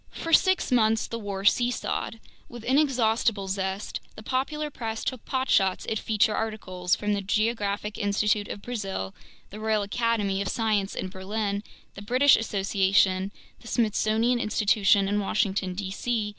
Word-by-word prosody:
For 330 - -5
six 375 -5 +4
months 225 -2 +3
the 230 - -5
war 200 -2 -5
seesawed. 240 0 +1 0.3
With 240 -2 -10
inexhaustible 235 -7 +2
zest, 190 +1 -3 0.2
the 215 - -10
popular 295 +5 -2
press 225 -4 -4
took 255 -3 -3
potshots 230 -8 +1
at 220 - 0
feature 215 -1 +2
articles 185 -5 -1
from 210 0 -1
the 200 - -1
Geographic 210 0 -1
Institute 205 0 +1
of 200 - -7
Brazil, 195 - -4 0.4
the 210 - -8
Royal 215 -1 +1
Academy 205 -2 0
of 200 - -2
Science 210 -3 0
in 185 - -3
Berlin, 200 +2 -3 0.3
the 200 - -10
British 255 +7 +5
Association, 195 -2 +1 0.3
the 235 - -14
Smithsonian 225 +1 +1
Institution 205 -2 +3
in 205 +1 +1
Washington, 195 -2 0
D.C. 195 +5 -4
210 Hz, 145 wpm, -26 LUFS, 195-230 Hz, 0.4 s, British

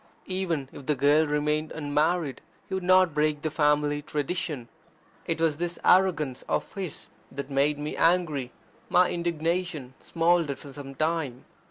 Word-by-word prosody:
Even 175 -7 -2
if 140 - -11
the 150 - +2
girl 145 +3 +4
remained 150 +1 0
unmarried, 150 -1 0 0.3
he - - -7
would 190 - -1
not 185 -2 +4
break 150 0 +1
the 155 - -1
family 150 -1 +2
tradition. 145 -3 -3 0.6
It 165 - -1
was 160 -3 +2
this 175 +1 -3
arrogance 165 -8 +3
of - - -1
his 190 -6 -6 0.2
that 140 +1 -6
made 140 +2 +2
me 150 +1 -4
angry. 160 -7 +2 0.4
My 180 0 +4
indignation 170 -4 -2
smouldered 165 -4 +1
for 140 0 -11
some 135 -1 -9
time. 155 -5 -1
155 Hz, 150 wpm, -27 LUFS, 145-170 Hz, 0.6 s, girl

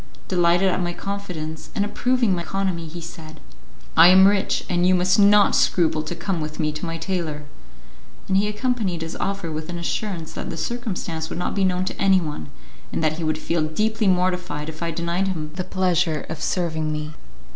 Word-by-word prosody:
Delighted 175 +1 +3
at 185 0 +1
my 175 0 -1
confidence, 175 -6 -5
and 205 - +1
approving 245 0 +1
my 175 - -1
economy, 180 -1 -2
he 170 +2 -8
said, 160 -2 -10 0.6
"I 165 +1 +9
am 190 +1 +8
rich, 200 -1 +1
and 175 -1 +1
you 185 - +5
must 180 +2 +3
not 205 0 +6
scruple 160 -3 +2
to 155 +3 -5
come 170 0 -2
with 155 0 -5
me 155 -1 +1
to 155 +3 -5
my 165 0 -3
tailor;" 165 -4 -3 0.8
and 190 - +1
he 200 +2 +3
accompanied 210 -6 -1
his 165 - -6
offer 195 -4 -2
with 155 +1 -5
an 175 - -4
assurance 170 -2 -3
that - - -5
the 165 - -5
circumstance 185 -9 -3
would - - -5
not 175 - -2
be 200 - 0
known 185 0 +1
to - - -5
anyone, 185 -7 +1 0.4
and - - -2
that 155 0 +1
he - - -3
would 155 -1 0
feel 165 +1 -1
deeply 215 +8 0
mortified 180 -5 0
if 160 +1 -10
I 170 - -1
denied 170 +3 -1
him 155 -5 -3
the 185 +2 -3
pleasure 180 -4 0
of 160 -1 -5
serving 160 -4 -1
me. 150 0 -4
175 Hz, 200 wpm, -23 LUFS, 160-190 Hz, 0.8 s, I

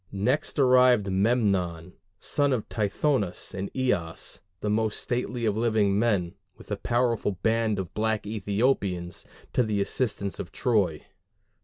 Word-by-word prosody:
Next 120 +13 -1
arrived 125 -6 +5
Memnon, 95 -5 +1 0.3
son 145 -2 +1
of 115 -4 -2
Tithonus 105 -1 -1
and 95 +1 -4
Eos, 90 -11 -1 0.2
the 105 - -1
most 110 0 0
stately 120 -1 -2
of 105 -2 +1
living 110 -3 +2
men, 100 -7 +1 0.2
with - - -14
a - - +1
powerful 120 -1 0
band 110 -1 +2
of 95 -3 -5
black 110 0 0
Ethiopians, 100 -4 -1 0.3
to - - +3
the 110 -3 0
assistance 100 -2 -1
of - - -6
Troy. 100 - 0
105 Hz, 135 wpm, -27 LUFS, 100-120 Hz, 0.3 s, arrived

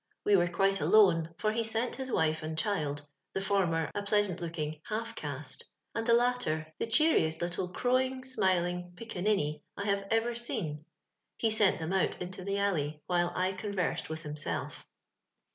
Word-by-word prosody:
We 205 - +5
were 175 -2 +4
quite 195 +3 +1
alone, 175 -7 +5
for 215 -1 +1
he 230 +1 0
sent 225 +2 -1
his 265 -1 -4
wife 160 -3 +1
and 155 0 -4
child 150 -7 -1 0.2
— 180 - -54
the - - +1
former 180 -5 +1
a 205 - -2
pleasant 200 -3 +1
looking 155 -2 -4
»* - - -36
half 230 +2 -2
caste," 145 -6 -5 0.3
and 225 0 -2
Uie 235 0 +6
latter 160 -11 0
the - - -1
cheeriest 225 - +3
little 175 +1 -2
crowing, 255 +3 +1
smiling 180 -7 0
"picca 225 -2 -6
ninny" 150 -8 +1 0.2
I 200 - -3
have 200 -1 0
ever 225 +1 +2
seen 160 -10 -3 0.3
— - - -54
he 225 - +1
sent 215 -3 +4
them 160 +3 -3
out 190 - +1
into 180 +1 -6
the 200 +1 -1
alley, 155 -7 0
while 175 -1 +1
I 185 +1 +1
conversed 190 -2 -2
with 160 0 -5
himself. 150 -1 -4
190 Hz, 180 wpm, -31 LUFS, 160-220 Hz, 0.3 s, Uie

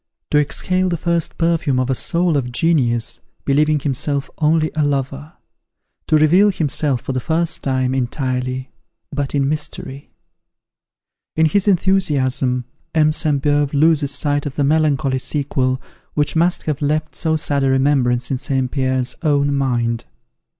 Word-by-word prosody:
To 150 - +4
exhale 185 +5 0
the 170 - -1
first 170 0 -1
perfume 165 -6 +1
of 130 - 0
a - - +3
soul 170 +5 0
of 125 -3 -1
genius, 125 -6 0 0.3
believing 150 +2 +2
himself 140 0 -2
only 155 0 +2
a 155 - 0
lover! 140 +2 -2 0.7
To - - +3
reveal 175 +7 +5
himself, 145 -6 0
for 135 - -4
the 130 - -1
first 165 +5 -1
time, 130 -1 0
entirely, 130 0 -2 0.4
but 140 0 -3
in 140 -1 +2
mystery!" 145 -2 -5 1.3
In 160 - +3
his 190 +6 +1
enthusiasm, 140 -10 +1 0.3
M. 155 -1 +4
Sainte 150 -3 0
Beuve 145 -1 +1
loses 150 -1 +3
sight 145 0 0
of 135 - -6
the 145 - 0
melancholy 145 -2 +1
sequel, 130 -2 -1 0.4
which 145 +1 0
must 170 +2 +2
have 155 -1 -3
left 155 +2 -1
so 160 -2 0
sad 145 -2 0
a 135 - +2
remembrance 130 -2 +1
in 130 - -1
St. 135 -2 -1
Pierre's 130 -2 0
own 145 -2 +2
mind. 120 -4 -1
145 Hz, 150 wpm, -19 LUFS, 130-155 Hz, 1.3 s, reveal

